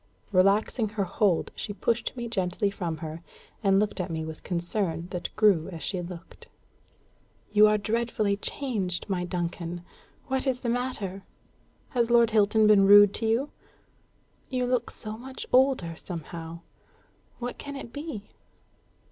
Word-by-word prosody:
Relaxing 205 +4 +3
her 210 -1 -1
hold, 190 -1 +1
she 205 - -4
pushed 235 +4 -1
me 240 -1 -3
gently 200 -1 -1
from 175 -5 -3
her, 160 +1 -6 0.4
and 195 -1 +4
looked 210 -1 -1
at 180 0 -2
me 160 -1 -3
with 160 -1 -7
concern 175 -1 -1
that 180 - -3
grew 195 -6 +4
as 165 -4 -7
she 185 -3 -2
looked. 175 0 -10 1.0
"You 210 0 +7
are 210 0 +3
dreadfully 215 -1 0
changed, 200 -7 -2
my 185 -3 -1
Duncan! 175 0 -4 0.4
What 265 +1 -1
is 255 -1 0
the 240 - -2
matter? 230 -6 -2 0.7
Has 240 -2 +1
Lord 235 -1 +5
Hilton 215 0 +4
been 205 -2 +6
rude 205 0 +8
to 225 - -2
you? 240 +6 +1 1.0
You 250 -1 0
look 250 0 0
so 215 +1 -6
much 260 +1 -7
older, 255 -11 +3
somehow. 165 -1 -7 0.8
What 245 0 -5
can 285 0 -7
it 240 -4 -8
be?" 285 -9 -7
205 Hz, 150 wpm, -27 LUFS, 180-235 Hz, 1.0 s, rude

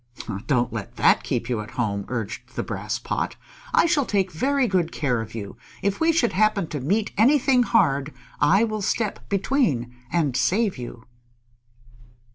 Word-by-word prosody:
"Don't 125 -4 +1
let - - -6
that - - +4
keep - - -2
you 120 -4 -1
at 105 - -8
home," 100 -5 -1
urged 115 -4 -5
the - - -1
Brass - - -3
Pot. - - -3 0.4
"I - - +4
shall 300 -5 +2
take 195 -2 +1
very 270 - +1
good 180 -5 +1
care 125 -6 0
of 110 0 -8
you. 105 -1 -6 0.3
If 200 0 0
we 325 +1 +4
should 305 -8 +1
happen 210 -2 +2
to 150 - -3
meet 200 - 0
anything 260 +1 +5
hard 145 - +2 0.3
I 190 +9 +4
will 215 -2 -2
step 210 +1 -2
between 195 - 0 0.2
and 150 -7 +1
save 195 - +1
you." 120 -1 -8
185 Hz, 165 wpm, -24 LUFS, -, 0.4 s, anything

